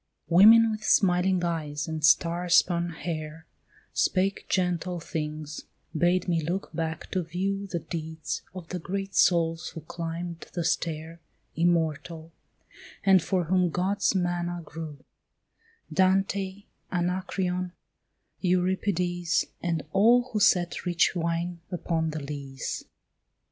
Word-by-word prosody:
Women 220 Hz, +6 st, +8 dB
with 215 Hz, 0 st, -5 dB
smiling 180 Hz, -1 st, +3 dB
eyes 155 Hz, -3 st, -2 dB
and 160 Hz, -1 st, -4 dB
star 170 Hz, +3 st, +3 dB
spun 175 Hz, 0 st, +4 dB
hair 160 Hz, -1 st, -5 dB, 0.5 s
Spake 195 Hz, +1 st, +1 dB
gentle 180 Hz, -1 st, 0 dB
things, 155 Hz, -2 st, -5 dB, 0.3 s
bade 175 Hz, +3 st, +2 dB
me 170 Hz, -2 st, +1 dB
look 175 Hz, +5 st, -3 dB
back 160 Hz, 0 st, -4 dB
to 185 Hz, -, 0 dB
view 195 Hz, +4 st, -2 dB
The 180 Hz, -, -3 dB
deeds 160 Hz, 0 st, -5 dB
of 175 Hz, -3 st, -8 dB
the 180 Hz, -, -3 dB
great 195 Hz, +3 st, -4 dB
souls 165 Hz, -2 st, +3 dB
who 165 Hz, -, -6 dB
climbed 170 Hz, +1 st, -6 dB
the 170 Hz, -, -2 dB
stair 165 Hz, 0 st, -2 dB, 0.3 s
Immortal, 165 Hz, -1 st, 0 dB, 0.7 s
and 190 Hz, -2 st, +6 dB
for 180 Hz, +2 st, 0 dB
whom 180 Hz, +1 st, +2 dB
God's 195 Hz, +4 st, 0 dB
manna 175 Hz, -1 st, -1 dB
grew: 150 Hz, -3 st, -8 dB, 0.9 s
Dante, 195 Hz, +1 st, +1 dB, 0.3 s
Anacreon, 180 Hz, 0 st, -1 dB, 0.7 s
Euripides, 180 Hz, -1 st, +1 dB, 0.2 s
And 170 Hz, -3 st, -1 dB
all 240 Hz, +7 st, +4 dB
who 215 Hz, -, +1 dB
set 175 Hz, -3 st, +3 dB
rich 175 Hz, 0 st, +2 dB
wine 170 Hz, +1 st, -2 dB
upon 165 Hz, -2 st, -1 dB
the 155 Hz, 0 st, -4 dB
lees. 140 Hz, -2 st, -5 dB
175 Hz, 115 wpm, -27 LUFS, 165-185 Hz, 0.9 s, Women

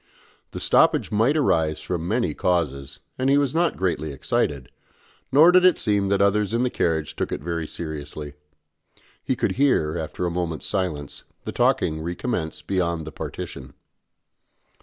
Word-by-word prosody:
The -, -, -7 dB
stoppage -, -, +3 dB
might 115 Hz, +8 st, +2 dB
arise 80 Hz, -, +1 dB
from 85 Hz, +1 st, -4 dB
many 115 Hz, +5 st, 0 dB
causes, 70 Hz, -6 st, -1 dB, 0.2 s
and 130 Hz, +1 st, +1 dB
he 140 Hz, -, +5 dB
was 140 Hz, -2 st, +1 dB
not 170 Hz, 0 st, +1 dB
greatly 85 Hz, -5 st, -1 dB
excited, 70 Hz, -1 st, -2 dB, 0.6 s
nor 155 Hz, +6 st, +7 dB
did 180 Hz, 0 st, +5 dB
it 185 Hz, -1 st, +5 dB
seem 100 Hz, -3 st, +1 dB
that 100 Hz, 0 st, +3 dB
others 105 Hz, +2 st, +2 dB
in 120 Hz, -, +1 dB
the 125 Hz, -, 0 dB
carriage 80 Hz, -3 st, -1 dB
took -, -, -3 dB
it -, -, -2 dB
very 85 Hz, 0 st, -3 dB
seriously; 75 Hz, -2 st, -6 dB, 0.9 s
he -, -, 0 dB
could -, -, 0 dB
hear, 85 Hz, -, +2 dB
after 80 Hz, +3 st, -4 dB
a 85 Hz, -, -1 dB
moment's 85 Hz, -3 st, -3 dB
silence, 80 Hz, -7 st, -3 dB, 0.2 s
the -, -, -4 dB
talking 80 Hz, 0 st, +1 dB
recommence 85 Hz, -1 st, -3 dB
beyond 85 Hz, -4 st, -1 dB
the 80 Hz, -, -7 dB
partition. -, -, -7 dB
85 Hz, 160 wpm, -24 LUFS, 80-115 Hz, 0.9 s, nor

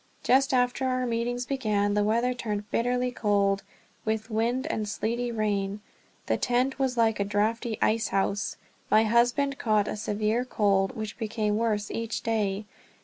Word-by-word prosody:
Just 270 Hz, +1 st, +4 dB
after 250 Hz, +1 st, +1 dB
our 255 Hz, 0 st, 0 dB
meetings 240 Hz, +1 st, -1 dB
began 210 Hz, -7 st, 0 dB
the 210 Hz, 0 st, +2 dB
weather 235 Hz, +4 st, +2 dB
turned 210 Hz, -4 st, -4 dB
bitterly 250 Hz, +1 st, +1 dB
cold, 200 Hz, -3 st, +1 dB, 0.4 s
with 220 Hz, +1 st, -2 dB
wind 235 Hz, +4 st, 0 dB
and 215 Hz, -1 st, -2 dB
sleety 235 Hz, +3 st, -2 dB
rain. 205 Hz, -2 st, -1 dB, 0.5 s
The -, -, +1 dB
tent 255 Hz, +2 st, 0 dB
was 260 Hz, -2 st, 0 dB
like 225 Hz, -2 st, +2 dB
a -, -, +2 dB
drafty 215 Hz, +3 st, 0 dB
ice 220 Hz, +1 st, +2 dB
house. 200 Hz, +1 st, -1 dB, 0.3 s
My 215 Hz, -, +5 dB
husband 245 Hz, +5 st, +2 dB
caught 215 Hz, -2 st, +2 dB
a -, -, -2 dB
severe 215 Hz, +3 st, 0 dB
cold, 200 Hz, -5 st, +1 dB
which 215 Hz, 0 st, -6 dB
became 215 Hz, -2 st, -1 dB
worse 215 Hz, -2 st, 0 dB
each 230 Hz, -1 st, -3 dB
day. 210 Hz, -2 st, -1 dB
220 Hz, 155 wpm, -27 LUFS, 210-245 Hz, 0.5 s, My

